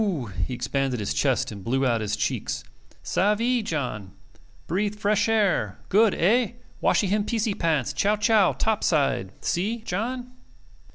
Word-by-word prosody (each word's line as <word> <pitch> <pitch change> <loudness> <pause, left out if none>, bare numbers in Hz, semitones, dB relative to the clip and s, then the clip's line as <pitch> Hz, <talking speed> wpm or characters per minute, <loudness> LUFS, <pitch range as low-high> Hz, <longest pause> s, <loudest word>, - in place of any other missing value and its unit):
He 130 - -4
expanded 130 0 -1
his 100 -9 -2
chest - - +1
and 100 -2 -9
blew 135 +5 0
out 120 -3 +1
his 105 - -1
cheeks. - - -2 0.4
"Savee, 230 +5 +1
John? 125 - -4 0.5
Breathe 205 +4 -1
fresh 210 +1 +1
air. 195 - +1
Good. 210 +1 +4
Eh? 235 +6 +2 0.3
Washee - - +3
him 205 +2 +1
piecie 220 -1 -1
pants, 160 -9 0
chow 205 +1 +2
chow 210 -2 +3
top 220 -1 0
side 135 - +1
see, 205 +7 0
John?" 245 +6 -3
195 Hz, 145 wpm, -25 LUFS, 130-215 Hz, 0.5 s, Good